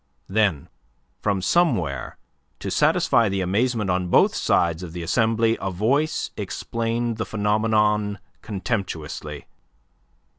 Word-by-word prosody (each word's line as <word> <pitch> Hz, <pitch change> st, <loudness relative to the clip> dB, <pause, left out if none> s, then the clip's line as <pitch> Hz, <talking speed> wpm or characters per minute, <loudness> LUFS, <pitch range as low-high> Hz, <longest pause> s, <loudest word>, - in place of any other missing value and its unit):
Then 95 Hz, -7 st, +1 dB, 0.5 s
from 100 Hz, -3 st, 0 dB
somewhere, 110 Hz, -, +1 dB, 0.4 s
to -, -, -5 dB
satisfy 115 Hz, -3 st, +3 dB
the 95 Hz, 0 st, -1 dB
amazement 105 Hz, +2 st, 0 dB
on 90 Hz, 0 st, 0 dB
both -, -, +4 dB
sides 85 Hz, 0 st, +1 dB
of 85 Hz, -3 st, -7 dB
the 85 Hz, -1 st, -5 dB
assembly, 115 Hz, +4 st, +2 dB
a 95 Hz, -, -1 dB
voice 125 Hz, -, 0 dB
explained 115 Hz, 0 st, -2 dB
the 115 Hz, -, -1 dB
phenomenon 105 Hz, -1 st, +1 dB, 0.2 s
contemptuously. 95 Hz, -, -4 dB
105 Hz, 110 wpm, -23 LUFS, 95-115 Hz, 0.5 s, both